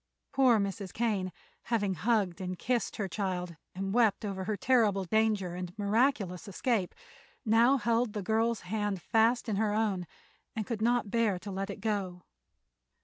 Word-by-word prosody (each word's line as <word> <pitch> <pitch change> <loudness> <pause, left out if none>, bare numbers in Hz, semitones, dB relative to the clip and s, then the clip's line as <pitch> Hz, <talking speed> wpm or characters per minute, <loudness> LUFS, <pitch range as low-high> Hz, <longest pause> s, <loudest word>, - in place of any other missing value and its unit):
Poor 260 -4 +5
Mrs. 200 -2 -3
Kane, 205 -5 -1 0.3
having 205 -5 0
hugged 195 0 0
and 185 -1 -4
kissed 245 +3 -1
her 200 - -2
child 180 -2 -3 0.2
and 195 +1 -3
wept 225 -3 +3
over 190 -2 -3
her 210 0 -1
terrible 215 -4 +3
danger 210 -3 +1
and 180 +1 -6
miraculous 210 -3 +1
escape, 200 -1 -1 0.5
now 235 +5 +5
held 235 -2 +1
the 210 -3 -3
girl's 225 +3 +1
hand 205 0 -2
fast 230 +6 +2
in 210 -3 -1
her 210 -1 +1
own 200 -5 0 0.5
and 220 -2 -2
could 225 -1 -4
not 235 -2 +1
bear 225 -5 +2
to 185 +3 -7
let 195 +1 -3
it - - -7
go. 190 -4 -2
210 Hz, 160 wpm, -30 LUFS, 190-230 Hz, 0.5 s, Poor